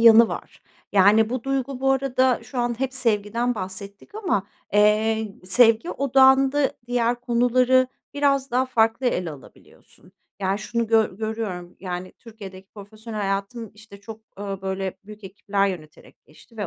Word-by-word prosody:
yanı 230 0 +8
var. - - -8 0.3
Yani 210 +3 +5
bu 255 -2 -3
duygu 270 -1 -2
bu 270 - +2
arada 260 -2 +1
şu 260 - -7
an 240 0 -1
hep 265 0 -2
sevgiden 230 -1 0
bahsettik 200 - -8
ama, 360 - -1 0.3
eee, 210 0 +2
sevgi 225 - +4
odağında 270 +1 +4
diğer 240 0 0
konuları 250 +1 +3 0.3
biraz 275 -1 +1
daha 255 +2 +1
farklı 230 0 +1
ele 180 -8 -1
alabiliyorsun. 145 -3 -17 0.3
Yani, 195 +1 0
şunu 235 +1 -2
gö 220 -4 +2
görüyorum. 215 -5 -5
Yani, 180 -1 -5
Türkiye'deki 195 -4 -12
profesyonel 215 +2 -8
hayatım, 200 +3 -3
işte, 210 -1 -15
çok, 220 +1 -10 0.2
ööö, 195 -1 -5
böyle, 190 0 -4
büyük 210 0 -12
ekipler 200 +1 -1
yöneterek 155 -5 -10
geçti 225 +9 -20
ve 205 - -3
220 Hz, 145 wpm, -23 LUFS, 200-250 Hz, 0.3 s, yanı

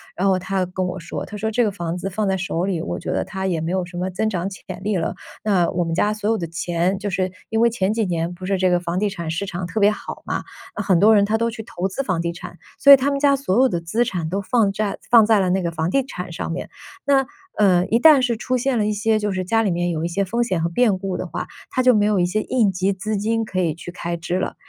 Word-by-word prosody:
然 - - -1
后 190 -1 +3
他 185 0 -1
跟 180 +1 -3
我 180 +1 -4
说， 165 - -5
他 205 - -9
说： 220 +2 -2
“这 240 +3 +1
个 210 - +1
房 175 -3 -4
子 195 +2 -4
放 210 +3 -2
在 190 - +1
手 180 -2 -2
里， 185 -4 -1
我 - - -4
觉 175 - -4
得 - - -1
它 190 0 -5
也 175 -4 0
没 165 +3 -2
有 185 -1 0
什 175 0 -9
么 185 +1 -1
增 215 +4 -1
长 185 -2 -2
潜 185 -2 -9
力 210 -2 +1
了。 165 -2 -1 0.3
那 190 -5 +2
我 175 0 0
们 165 - -3
家 205 +5 +2
所 215 0 -2
有 225 - +2
的 170 - -4
钱” 175 +3 -1
就 205 +1 -3
是 185 0 -1 0.2
因 225 +1 0
为 235 0 +5
前 205 -3 0
几 225 -1 0
年 170 -1 -2
不 185 +1 -9
是 195 0 0
这 185 0 +2
个 175 - +3
房 175 0 -3
地 210 -1 +1
产 170 -4 -5
市 170 +5 -2
场 180 -1 -4
特 215 +3 -2
别 205 - +6
好 - - -7
嘛， - - -2 0.3
那 205 - 0
很 190 -4 +3
多 210 +5 +6
人 200 -1 +5
他 220 +2 +1
都 230 +1 0
去 220 0 -7
投 190 -2 -3
资 195 - -3
房 185 -8 -1
地 170 0 -1
产， 175 0 -10 0.2
所 280 0 +9
以 - - +12
他 275 +2 0
们 280 - -1
家 280 -1 +4
所 255 -5 0
有 265 - +6
的 175 -8 -2
资 220 +9 0
产 175 -8 -3
都 190 +4 -1
放 205 0 +2
债 205 0 -2
放 230 -3 +8
在 215 -2 +4
了 185 - +1
那 190 +1 +1
个 170 -1 -2
房 160 0 -2
地 270 +7 +1
产 180 -8 -7
上 165 - -4
面。 180 - -5 0.4
那， 275 -1 +3 0.3
呃， 185 -3 +4
一 230 - +2
旦 300 -1 +7
是 235 -3 0
出 255 +2 -1
现 255 0 0
了 210 - +1
一 215 - 0
些 215 +1 +1
就 205 -2 -1
是 185 - -2
家 225 +5 +2
里 200 -4 +1
面 175 +1 0
有 165 -1 -2
一 - - +1
些 195 +4 -1
风 230 +6 -1
险 185 -8 0
和 170 - +1
变 205 +1 +2
故 190 -1 -3
的 - - -4
话， - - -5 0.2
他 255 - 0
就 255 - +6
没 210 -2 +3
有 210 -1 +2
一 - - +3
些 210 +5 0
应 225 -6 +2
急 185 +2 0
资 210 +3 -3
金 225 +3 0
可 190 -4 -3
以 165 -4 +1
去 175 +1 -9
开 170 -1 -4
支 170 +2 -2
了。 - - -3
190 Hz, 325 characters per minute, -21 LUFS, 175-220 Hz, 0.4 s, 以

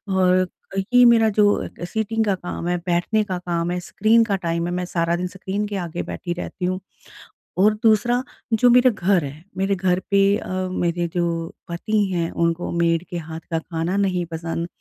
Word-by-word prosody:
और 185 0 +3 0.5
ये 245 0 +8
मेरा 230 -2 +6
जो 205 0 +2 0.2
सिटिंग 220 +4 -1
का 200 -2 +2
काम 180 -1 -5
है, 175 0 +1
बैठने 175 +5 0
का 185 -3 -3
काम 175 -1 -2
है, 180 - -1
स्क्रीन 215 +6 +3
का 210 -3 0
टाइम 170 -2 -2
है, 175 - -3
मैं 180 0 -2
सारा 170 -1 0
दिन 180 +1 -2
स्क्रीन 190 +2 -4
के 205 - -5
आगे 175 -2 -4
बैठी 175 - -4
रहती 180 +1 -5
हूँ। 185 +1 -1 0.8
और 205 +3 +5
दूसरा 235 +3 +3 0.3
जो 245 +3 +5
मेरा 250 +1 +6
घर 195 -4 +1
है, 145 +3 -8
मेरे 195 +1 +1
घर 180 -1 +1
पे 200 0 +5
अ, - - -8 0.2
मेरे 175 -1 -1
जो 175 -2 +1 0.4
पति 210 +5 0
हैं 170 -2 -1
उनको 170 +1 -1
मेड 170 -1 +1
के 175 - -4
हाथ 160 -1 -6
का 165 - +1
खाना 165 +2 -3
नहीं 185 -3 +1
पसंद, 165 +1 -3
180 Hz, 190 wpm, -22 LUFS, 170-205 Hz, 0.8 s, ये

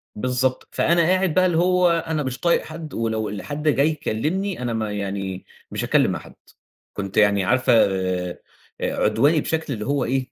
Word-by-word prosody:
بالضبط، 125 +3 -1
فأنا 170 0 +2
قاعد 185 0 +2
بقى 185 0 +4
اللي 170 -3 +1
هو 180 0 +3
أنا 160 -2 0
مش 130 -1 -4
طايق 170 -1 +2
حد، 160 -1 -8
ولو 110 -1 -1
ال 100 -2 -5
حد 145 - -5
جاي 145 0 +4
يكلمني 155 - -2
أنا 120 -2 -2
ما 110 -2 -2
يعني 95 -2 -4 0.3
مش - - -3
هاتكلم - - +3
مع - - -3
حد، - - -15 0.6
كنت 100 0 -5
يعني 100 -2 +4
عارفة 130 +5 +2
آآ، 95 -4 +1 0.4
عدواني 140 +9 +2
بشكل 160 -2 -2
اللي 105 -3 -5
هو 140 -1 0
إيه 130 +1 -2
130 Hz, 180 wpm, -22 LUFS, 105-160 Hz, 0.6 s, بقى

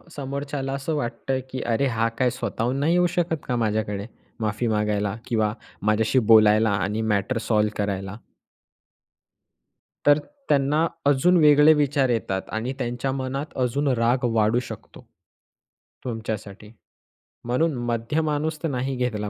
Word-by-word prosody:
समोरच्याला 140 0 -4
असं 140 +3 -2
वाटतं, 130 0 -2
की 130 0 -4
"अरे 120 +4 0
हा 115 -2 0
काय 125 -1 +3
स्वतःहून 120 +3 -2
नाही 160 +4 +2
येऊ 180 0 +4
शकत 170 -2 0
का 125 - 0
माझ्याकडे 105 -3 -1 0.3
माफी 110 +2 -1
मागायला 105 -1 0
किंवा 110 -3 0 0.3
माझ्याशी 110 +5 +2
बोलायला 110 0 +6
आणि 100 +2 -1
मॅटर 105 +2 0
सॉल्व्ह 105 -1 +2
करायला?" 100 -1 -3 1.9
तर 145 0 +6 0.3
त्यांना 145 +3 +3 0.2
अजून 145 +6 +4
वेगळे 150 0 +7
विचार 145 -3 +1
येतात 95 -5 -1
आणि 120 +4 -2
त्यांच्या 125 +1 -2
मनात 135 +2 -4
अजून 135 +4 0
राग 125 0 +1
वाढू 110 +2 +3
शकतो 125 - -10 1.0
तुमच्यासाठी. 110 -3 -6 0.7
म्हणून 145 +6 +1
मध्य 120 +6 -1
माणूस 155 0 -2
तर - - +1
नाही 130 0 -2
घेतला 110 -4 -2
125 Hz, 130 wpm, -24 LUFS, 110-140 Hz, 1.9 s, वेगळे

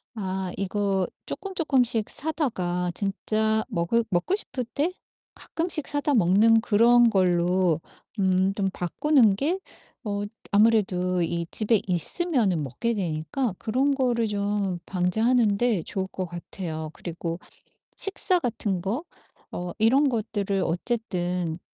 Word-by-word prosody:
아 190 -3 -3
이거 195 -1 0 0.2
쪼끔쪼끔씩 265 - +1
사다가 185 - -1
진짜 215 +3 0
먹으 170 +8 +1
먹고 175 - +1
싶을 255 - -2
때 300 +5 +1 0.4
가끔씩 325 -3 -2
사다 290 0 0
먹는 215 +4 +5
그런 235 +2 +5
걸로 180 -3 +2 0.4
음 190 0 +2
좀 195 -2 0
바꾸는 225 - +3
게 315 - 0 0.5
어 205 -1 -2 0.3
아무래도 195 -4 +3
이 170 0 -1
집에 215 -1 +3
있으면은 195 - +1
먹게 140 - -2
되니까 185 - -2
그런 265 +6 +1
거를 240 -4 +1
좀 200 -3 -1
방제하는데 215 +1 +1
좋을 190 -1 -3
것 190 -1 -5
같아요. 170 -2 -6
그리고 170 0 -5 0.6
식사 380 -2 +2
같은 210 - -2
거 215 - -2 0.5
어 180 0 -5
이런 260 +6 +4
것들을 205 -4 -1
어쨌든 180 -4 -2
205 Hz, 240 characters per minute, -25 LUFS, 180-240 Hz, 0.6 s, 먹는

